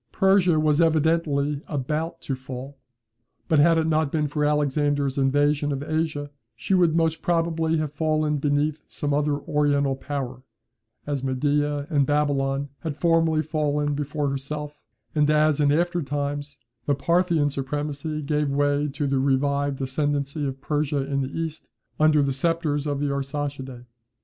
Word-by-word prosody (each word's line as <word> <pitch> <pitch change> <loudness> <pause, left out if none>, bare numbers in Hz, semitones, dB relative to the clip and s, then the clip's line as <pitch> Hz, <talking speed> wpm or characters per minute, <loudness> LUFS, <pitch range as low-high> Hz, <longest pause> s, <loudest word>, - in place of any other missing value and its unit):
Persia 190 -4 +4
was 155 +1 +3
evidently 155 -3 +1
about 150 +3 -3
to 135 - -3
fall; 130 +1 -8 0.7
but, 155 - +3
had 165 +2 +5
it 160 - +2
not 155 -2 +1
been 150 -2 0
for 150 +1 -2
Alexander's 145 -1 +1
invasion 145 +2 +2
of 140 0 -3
Asia, 155 -2 -2 0.2
she 120 +11 -2
would 175 -4 +4
most 160 -1 +1
probably 165 -1 +1
have 155 -2 -2
fallen 155 0 0
beneath 145 +1 0
some 145 -1 -2
other 145 0 +1
Oriental 145 -2 +1
power, 130 -2 -5 0.6
as 145 -2 -3
Media 145 +2 0
and 140 -3 +2
Babylon 140 -1 0
had 155 -3 -5
formerly 165 -2 +2
fallen 150 -1 0
before 145 0 -2
herself, 150 +2 -5 0.3
and 150 -1 +2
as, 155 0 +3
in 145 -1 +4
after 175 +3 +1
times, 145 0 -3 0.3
the 145 - +3
Parthian 170 -1 +2
supremacy 145 +2 -3
gave 150 0 0
way 145 +1 +1
to 145 +1 -3
the 135 -1 +1
revived 140 +1 +1
ascendancy 145 +1 -1
of 135 0 -6
Persia 145 -1 -1
in 140 0 -1
the 130 - -3
East, 160 0 -5 0.3
under 155 -1 +4
the 135 -1 0
sceptres 155 0 0
of 145 -1 -1
the 145 -1 0
Arsacidae. 140 -2 -4
145 Hz, 150 wpm, -24 LUFS, 140-155 Hz, 0.7 s, had